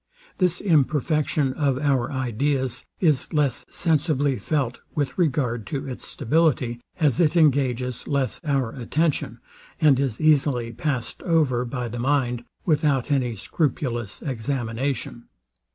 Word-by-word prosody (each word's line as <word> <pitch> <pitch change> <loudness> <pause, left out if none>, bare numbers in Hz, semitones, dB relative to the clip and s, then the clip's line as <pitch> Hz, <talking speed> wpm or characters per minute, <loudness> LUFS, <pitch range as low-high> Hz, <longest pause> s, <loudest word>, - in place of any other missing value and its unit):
This 180 -2 +3
imperfection 150 -4 +1
of 140 -2 +1
our 135 -4 +1
ideas 130 0 -1
is 155 -7 +2
less 140 -5 0
sensibly 150 -4 +1
felt 130 +1 -1 0.2
with 145 -3 -1
regard 125 - 0
to 135 +5 -4
its 130 - -6
stability, 125 -4 +1 0.2
as 150 -2 +2
it 170 0 +3
engages 130 -5 +2
less 140 -4 -1
our 135 -6 0
attention, 150 +6 -1 0.4
and 145 -5 +5
is 135 -5 -1
easily 140 -6 +2
past 125 +1 -3
over 145 -8 +2
by 125 0 -3
the 120 +1 -6
mind, 125 -2 0 0.2
without 150 -4 +1
any 125 -4 +1
scrupulous 120 - -2
examination. 120 -1 -3
135 Hz, 120 wpm, -24 LUFS, 120-150 Hz, 0.4 s, and